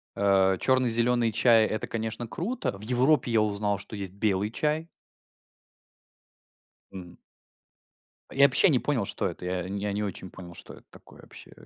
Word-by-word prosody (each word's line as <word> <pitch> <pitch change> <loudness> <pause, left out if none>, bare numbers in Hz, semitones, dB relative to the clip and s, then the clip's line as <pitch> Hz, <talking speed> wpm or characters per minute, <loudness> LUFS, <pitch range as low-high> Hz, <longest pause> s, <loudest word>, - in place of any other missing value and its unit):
э, 95 -1 +2
черный, 130 -2 +2
зеленый 120 0 +2
чай- 115 0 +4
это, 110 - -4
конечно, 115 +1 -4
круто. 185 - -4
В - - -13
Европе 125 +3 +1
я 110 -1 +3
узнал, 105 -1 -1
есть 100 -4 -6
белый 100 0 -1
чай. 155 +5 -2 2.1
М. 90 -2 -10 1.2
Я 140 - +4
вообще 140 +7 +5
не 135 - +3
понял, 125 -5 -1
что - - -3
это. 90 -1 -6
Я 90 0 -3
не 100 +1 -5
я 105 -1 -2
не 105 +1 -2
очень 95 -2 -6
понял, 85 -2 -11
что - - -11
это - - -17
такое - - -17
вообще, - - -13
110 Hz, 160 wpm, -27 LUFS, 100-125 Hz, 2.1 s, вообще